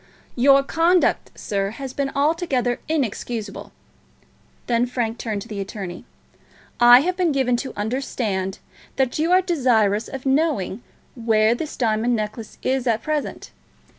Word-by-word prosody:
"Your 275 +2 +5
conduct, 335 +5 +2
sir, 195 -1 -1
has 260 +4 -7
been 280 -1 -1
altogether 280 -5 0
inexcusable." 235 -7 -3 0.9
Then 240 0 +1
Frank 240 -2 -2
turned 210 -4 -3
to - - -14
the 210 -3 -6
attorney. 195 -3 -6 0.7
"I 240 +1 +8
have 365 +4 -1
been 360 -3 +1
given 260 -3 +1
to 265 - -5
understand 210 -4 -2 0.4
that 265 +1 0
you 325 +3 +1
are 370 +1 +5
desirous 230 - +2
of 270 0 -8
knowing 270 - 0 0.3
where 225 -2 +2
this 305 +5 -5
diamond 230 0 +1
necklace 215 +1 -5
is 260 -1 0
at 225 -2 +1
present. 305 -2 -3
245 Hz, 135 wpm, -22 LUFS, 220-275 Hz, 0.9 s, I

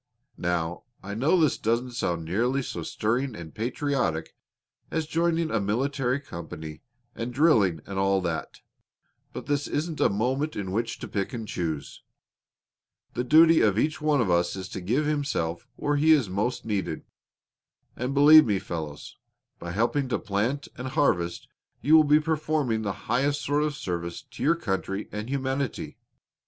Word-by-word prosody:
Now, 85 -1 -2 0.2
I 100 +1 -5
know 140 - +2
this 155 -5 +2
doesn't 115 +3 0
sound 85 -9 -2
nearly 120 +10 0
so 85 - -5
stirring 120 +9 -1
and 85 -4 -9
patriotic 120 - -1 0.5
as 160 -1 -1
joining 165 0 0
a 115 - +1
military 130 +5 0
company 80 - -8 0.3
and 115 +2 -4
drilling 115 - +3
and 100 -1 -4
all 95 0 +3
that; 85 -3 -4 0.7
but - - -7
this 145 0 0
isn't 155 +1 -2
a - - +4
moment 130 +9 -1
in 95 -2 -4
which 115 +3 -2
to - - -5
pick 100 +5 -3
and 115 -3 -5
choose. 80 -6 -4 1.1
The 125 - -1
duty 160 +5 +6
of 105 -2 +3
each 155 +6 0
one 150 -3 +3
of 100 -6 +1
us 85 +1 +2
is 95 -1 -6
to 95 - -6
give 125 +12 0
himself 140 - -1
where 145 0 0
he 160 +2 +6
is 130 -11 +2
most 105 +6 -1
needed. 105 -3 -2 0.9
And, 125 +2 -2
believe 150 0 +8
me, 105 -2 +2
fellows, 80 -5 -6 0.4
by 85 - -6
helping 120 +7 0
to - - +1
plant 115 +7 -1
and 130 - -4
harvest 90 - 0 0.3
you 155 +3 +4
will 155 - +8
be 150 +1 +5
performing 155 -7 0
the 100 -2 -1
highest 140 +4 +1
sort 145 +1 +1
of 150 -1 -1
service 85 - -4
to 130 -3 -13
your 165 +4 +4
country 95 - -3
and 105 +3 -5
humanity. 135 -2 -2
120 Hz, 165 wpm, -26 LUFS, 95-145 Hz, 1.1 s, believe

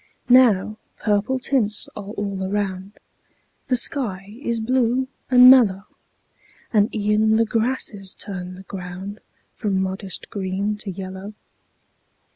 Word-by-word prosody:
Now 220 -5 +5 0.2
purple 210 +5 0
tints 245 -5 +1
are 200 -1 -7
all 200 -2 -4
around; 195 0 -3 0.7
The 255 - +2
sky 210 -6 -2
is 235 -4 -1
blue 250 +2 +1 0.2
and 250 -1 +8
mellow; 220 -7 +6 0.9
And 210 0 +4
e'en 215 +1 +2
the 225 +1 +3
grasses 220 -4 -2
turn 185 -3 -6
the 190 - -11
ground 190 +2 -7 0.3
From 200 -4 -1
modest 190 0 -4
green 195 +1 -2
to 210 -1 -5
yellow. 190 +2 -7
205 Hz, 115 wpm, -22 LUFS, 190-230 Hz, 0.9 s, and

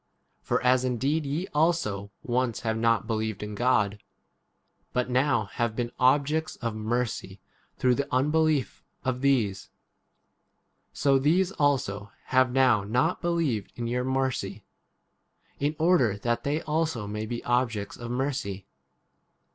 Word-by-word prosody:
1 - - -45
For - - +1
as 125 0 +4
indeed 135 +5 0
ye 155 +6 -2
also 150 - +1
once 125 -1 -1
have 110 -1 -1
not 115 0 +2
believed 110 -2 -2
in 105 0 -5
God, 105 -3 +1 0.9
but 125 0 0
now 130 -3 +2
have 115 +2 -2
been 120 0 -2
objects 145 +4 +2
of 115 -3 -3
mercy 110 -3 -2 0.4
through 125 -1 +3
31 - - -2
the - - -1
unbelief 150 -2 +1 0.2
of 130 -1 -1
these; 115 -9 +1 1.2
so 135 -1 +2
these 175 +7 +2
also 125 - 0 0.2
have 130 -1 +4
now 125 -5 +4
not 125 - 0
believed 165 - 0
in 120 - -4
your 125 +2 -1
mercy, 130 -7 -2 1.0
in 145 +2 0
order 160 - +3
that 120 +3 -1
they 150 +4 -1
also 155 -5 -1
32 105 0 -6
may 105 0 -3
be 120 +1 -4
objects 115 -5 0
of 120 -1 -7
mercy." 125 -7 -2
125 Hz, 140 wpm, -27 LUFS, 110-140 Hz, 1.2 s, as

